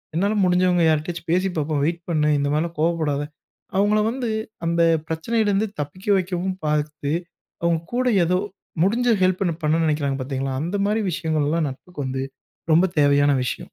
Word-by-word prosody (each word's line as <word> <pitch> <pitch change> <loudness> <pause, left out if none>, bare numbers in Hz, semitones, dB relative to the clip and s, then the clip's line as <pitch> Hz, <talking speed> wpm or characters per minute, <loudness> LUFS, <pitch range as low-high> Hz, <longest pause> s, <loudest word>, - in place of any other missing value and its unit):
என்னால 200 +5 +1
முடிஞ்சவுங்க 180 -1 +3
யார்கிட்டயாச்சும் 165 +2 -2
பேசி 185 +2 +2
பார்ப்போம் 150 -1 0
வெயிட் 170 +2 -1
பண்ணு! 150 -2 +2
இந்த 140 - 0
மாரிலாம் 165 +1 -1
கோவப்படாத! 155 -3 +1 0.6
அவுங்கள 205 +2 +3
வந்து 250 -2 -3 0.4
அந்த 170 0 +1 0.3
பிரச்சனையிலிருந்து 205 +5 0
தப்பிக்க 185 +8 -8
வைக்கவும் 185 0 -2
பார்த்து, 150 -1 -1 0.5
அவுங்க 170 -1 +2
கூட 255 0 +1 0.2
ஏதோ 180 +2 +2 0.5
முடிஞ்ச 240 +5 +2
ஹெல்ப்ப 185 +1 +2 0.2
பண்ணணுன்னு 160 +2 +2
நினைக்கிறாங்க 140 -3 0
பார்த்தீங்களா! 135 0 -3
அந்தமாரி 205 +5 0
விஷயங்கள்லாம் 155 -1 0
நட்புக்கு 145 +4 -9
வந்து 130 0 -2 0.5
ரொம்ப 170 +4 +5 0.2
தேவையான 145 0 +4
விஷயம். - - -2
165 Hz, 140 wpm, -22 LUFS, 150-185 Hz, 0.6 s, ரொம்ப